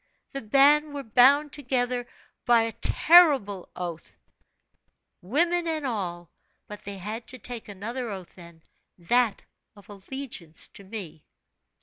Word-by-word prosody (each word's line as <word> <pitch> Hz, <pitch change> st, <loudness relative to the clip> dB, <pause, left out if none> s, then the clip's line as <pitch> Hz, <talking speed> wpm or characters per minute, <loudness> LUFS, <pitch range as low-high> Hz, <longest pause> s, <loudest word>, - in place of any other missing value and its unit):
The 275 Hz, -, -5 dB
band 285 Hz, +6 st, +4 dB
were 280 Hz, -, -4 dB
bound 275 Hz, +6 st, +4 dB
together 250 Hz, -3 st, -1 dB, 0.4 s
by 235 Hz, -1 st, +5 dB
a 225 Hz, -, -2 dB
terrible 275 Hz, -, +4 dB
oath, 170 Hz, -3 st, -7 dB, 1.0 s
women 335 Hz, -, +1 dB
and 315 Hz, -3 st, -2 dB
all; 175 Hz, -, -4 dB, 0.4 s
but 210 Hz, 0 st, -9 dB
they 200 Hz, 0 st, -6 dB
had 215 Hz, +5 st, -6 dB
to 255 Hz, -, -6 dB
take 240 Hz, 0 st, -7 dB
another 230 Hz, +5 st, -5 dB
oath 190 Hz, -4 st, -8 dB
then, 170 Hz, -2 st, -15 dB, 0.3 s
that 230 Hz, +5 st, +1 dB, 0.3 s
of 205 Hz, 0 st, -18 dB
allegiance 200 Hz, -, -7 dB
to 200 Hz, -, -13 dB
me. 190 Hz, -7 st, -8 dB
230 Hz, 125 wpm, -26 LUFS, 195-275 Hz, 1.0 s, by